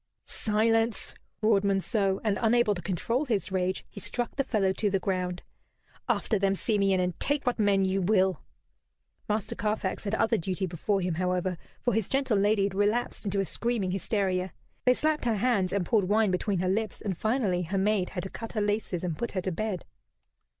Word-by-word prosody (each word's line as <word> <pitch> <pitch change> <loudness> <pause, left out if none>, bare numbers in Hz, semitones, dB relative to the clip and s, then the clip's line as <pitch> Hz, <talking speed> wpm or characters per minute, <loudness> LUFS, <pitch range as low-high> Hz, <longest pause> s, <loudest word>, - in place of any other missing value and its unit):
"Silence!" 225 +1 +1 0.3
roared 215 -2 +4
Monceux; 195 0 +1
and, 210 -3 +1
unable 235 -1 +3
to 175 - -5
control 230 - -1
his 205 - 0
rage, 185 0 -1
he - - -10
struck 240 +4 -3
the 275 - +1
fellow 200 -7 +1
to 205 +2 0
the 195 - +2
ground. 185 -2 -2 0.7
"After 215 - +1
them, 195 0 +2
Simeon, 195 -2 +1
and 180 -1 -1
take 290 0 0
what 245 -2 0
men 200 -2 +3
you 190 +1 0
will." 185 -3 +2 0.9
Master 210 -1 0
Carfax 210 -2 -2
had 205 +2 0
other 225 +1 +2
duty 185 +2 -2
before 190 +3 -1
him, 180 -1 -1
however, 180 +1 0 0.3
for 245 - +2
his 220 -2 0
gentle 270 -4 +1
lady 205 0 +3
had 195 -1 0
relapsed 210 +4 0
into 200 0 0
a - - -1
screaming 230 -3 -1
hysteria. 190 -2 0 0.3
They 250 0 +5
slapped 305 -1 +1
her 230 -2 +2
hands 205 -4 +1
and 200 -3 0
poured 205 -4 +2
wine 215 -1 +3
between 190 +2 0
her 185 - 0
lips, 210 +2 -1
and 195 -3 -2
finally 215 -3 0
her 180 +3 -2
maids 195 -1 +1
had 180 - -3
to 190 - -5
cut 225 - -7
her 215 - 0
laces 205 -4 -1
and 175 -3 -2
put 235 - -3
her 185 - -1
to 185 - -2
bed. 195 +1 -3
200 Hz, 195 wpm, -28 LUFS, 185-220 Hz, 0.9 s, They